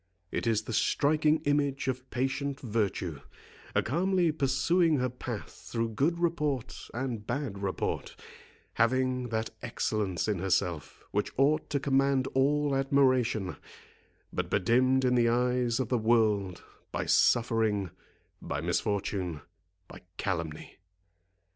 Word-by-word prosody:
It - - -2
is 110 -2 +2
the 115 - -5
striking 150 +6 +2
image 145 -2 0
of 130 0 -3
patient 135 +2 -2
virtue, 100 - -2 0.6
calmly 175 +4 +2
pursuing 155 +3 +2
her 125 -1 0
path 120 -3 -6 0.2
through 115 -1 0
good 145 +10 +1
report 150 -7 -2
and 120 -4 -4
bad 130 -9 -3
report, 95 -2 -3 0.6
having 125 +1 +1
that 110 0 -2
excellence 100 -4 -1
in 105 -4 0
herself 90 -4 -1
which 105 - -1
ought 150 +4 +2
to 140 - 0
command 135 -1 +2
all 145 +2 +2
admiration, 130 -7 +2 0.8
but - - -2
bedimmed 130 +6 +3
in 125 - +3
the 120 -1 +4
eyes 125 0 +1
of 130 -4 -1
the 125 - +1
world, 110 -5 +2 0.3
by - - -2
suffering, 110 -6 +2 0.5
by 70 - -3
misfortune, 90 -1 -1 0.5
by - - -12 0.2
calumny. 85 -6 -4
125 Hz, 120 wpm, -29 LUFS, 105-140 Hz, 0.8 s, the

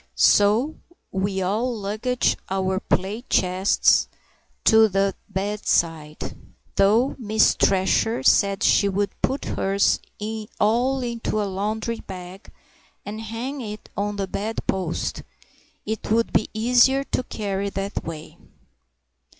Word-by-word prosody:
So 220 +9 +4 0.3
we 190 0 -1
all 225 +6 -1
lugged 215 +5 0
our 190 0 0
plate 205 +6 -2
chests 185 +2 +3 0.6
to 220 0 +6
the 195 0 +1 0.2
bedside; 170 -6 -1 0.4
though 220 +7 +3
Miss 220 -2 +3
Thresher 195 - +2
said 200 +6 +3
she 200 - +4
should 200 +1 -2
put 270 - -1
hers 195 +1 +1 0.6
all 250 +5 +2
into 235 -2 -2
a 210 - 0
laundry 215 +4 -3
bag 185 +1 -10 0.5
and 215 +2 -6
hang 235 +5 -5
it 215 -2 -8
on 205 +1 -2
the 200 -1 -2
bedpost; 190 -3 -3 0.6
it 220 0 -4
would 230 +2 +1
be - - +2
easier 250 +4 +4
to 275 - -2
carry 200 -5 -3
that 195 +1 -4
way. 160 -1 -8
205 Hz, 115 wpm, -23 LUFS, 195-225 Hz, 0.6 s, to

